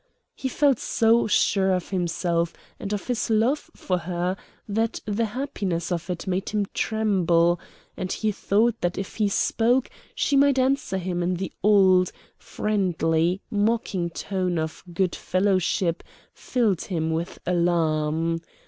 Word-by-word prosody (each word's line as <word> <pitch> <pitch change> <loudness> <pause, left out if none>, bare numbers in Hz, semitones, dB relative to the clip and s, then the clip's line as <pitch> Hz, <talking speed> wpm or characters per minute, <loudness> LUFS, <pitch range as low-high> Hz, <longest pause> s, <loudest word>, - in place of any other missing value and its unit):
He 265 - -4
felt 275 -1 +2
so 230 +1 +3
sure 195 -2 +3
of 180 - -4
himself 170 -2 0 0.2
and 200 - -5
of 205 -1 -2
his 245 -3 -1
love 230 +7 +1
for 180 -1 -1
her 175 +2 -2 0.3
that 225 +2 -1
the 215 +2 0
happiness 205 - -3
of 175 +1 -3
it 180 +1 -3
made 190 +1 -1
him 210 -1 0
tremble, 175 -6 +2 0.4
and 185 - -4
the 215 +3 0
thought 220 +3 +1
that 175 0 -1
if 195 - -5
he 210 -2 +2
spoke 240 +5 +1 0.2
she 285 - +1
might 280 -1 +4
answer 265 -6 +1
him 180 -1 -2
in 180 +1 0
the 185 0 -4
old, 190 -3 +5 0.2
friendly, 180 -3 0
mocking 205 -4 0
tone 185 0 -2
of 160 0 -4
good 180 +1 0
fellowship 185 -2 +1 0.3
filled 220 -8 0
him 160 -4 -1
with 165 +2 -3
alarm. 165 -2 +1
190 Hz, 140 wpm, -25 LUFS, 175-220 Hz, 0.4 s, old